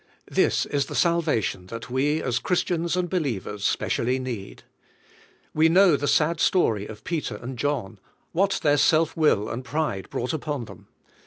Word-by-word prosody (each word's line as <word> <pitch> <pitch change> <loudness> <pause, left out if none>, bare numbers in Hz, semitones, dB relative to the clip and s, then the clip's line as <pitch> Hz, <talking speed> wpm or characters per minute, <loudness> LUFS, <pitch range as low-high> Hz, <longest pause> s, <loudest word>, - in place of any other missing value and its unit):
This - - +2
is 140 -2 -1
the - - -6
salvation 155 - +1
that 115 +4 -8
we 145 +4 +1
as 125 -2 0
Christians 175 +1 0
and 180 -1 0
believers 120 - -3
specially 125 +5 0
need. 120 -7 -6 0.9
We 160 +1 +4
know 180 -1 +6
the 145 +1 -2
sad 160 +3 +2
story 110 - +2
of 105 - -10
Peter 155 -10 -3
and 120 +5 -7
John; 120 -6 -2 0.3
what 195 +3 +1
their 145 -1 +4
self 160 +3 +3
will 150 -10 +2
and 120 +3 -5
pride 140 -8 -2
brought 125 +6 -3
upon 150 -5 -3
them. - - -14
145 Hz, 160 wpm, -25 LUFS, 115-165 Hz, 0.9 s, know